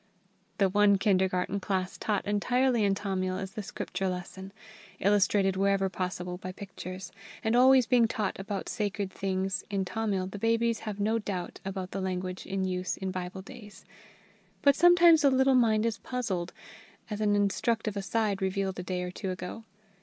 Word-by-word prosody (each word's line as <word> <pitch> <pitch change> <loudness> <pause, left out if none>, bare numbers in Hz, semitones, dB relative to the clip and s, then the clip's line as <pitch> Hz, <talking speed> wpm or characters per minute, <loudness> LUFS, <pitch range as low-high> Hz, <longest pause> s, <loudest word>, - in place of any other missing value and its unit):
The 195 - +4
one 200 +1 +4
kindergarten 190 -1 +1
class 185 -1 -2
taught 210 -2 -1
entirely 245 +3 +2
in 200 -1 +2
Tamil 185 -2 -2
is 190 0 -5
the 215 - -5
Scripture 195 -1 -3
lesson, 185 +1 -6 0.5
illustrated 195 -1 +3
whenever 195 0 +2
possible 180 -1 -4
by 185 - -6
pictures; 185 -1 -8 0.3
and 220 0 +1
being 245 - +6
always 260 -1 +6 0.2
taught 210 -4 -2
about 195 0 -4
sacred 205 -2 -2
things 190 0 -2
in 195 -2 -1
Tamil, 200 -2 -1
the 190 +2 -7
babies 230 +1 +1
have 205 -1 -6
no 220 +3 +1
doubt 190 -5 -5
about 190 -1 -5
the 195 - -3
language 185 -1 -4
in 195 0 -2
use 185 0 -2
in 190 -1 -3
Bible 185 +1 -5
days. 210 -3 -12 0.8
But 280 -1 +6
sometimes 345 -2 +6
a 280 - +6
little 265 0 +4
mind 225 -3 +3
is 230 -2 -1
puzzled, 200 -9 -3 0.6
as 210 0 -3
an 205 -1 +3
instructive 215 +2 0
aside 200 0 -1
revealed 190 0 -1
a - - -4
day 180 0 -3
or 180 - -4
two 190 +1 -5
ago. 185 +5 -6
195 Hz, 170 wpm, -29 LUFS, 185-215 Hz, 0.8 s, being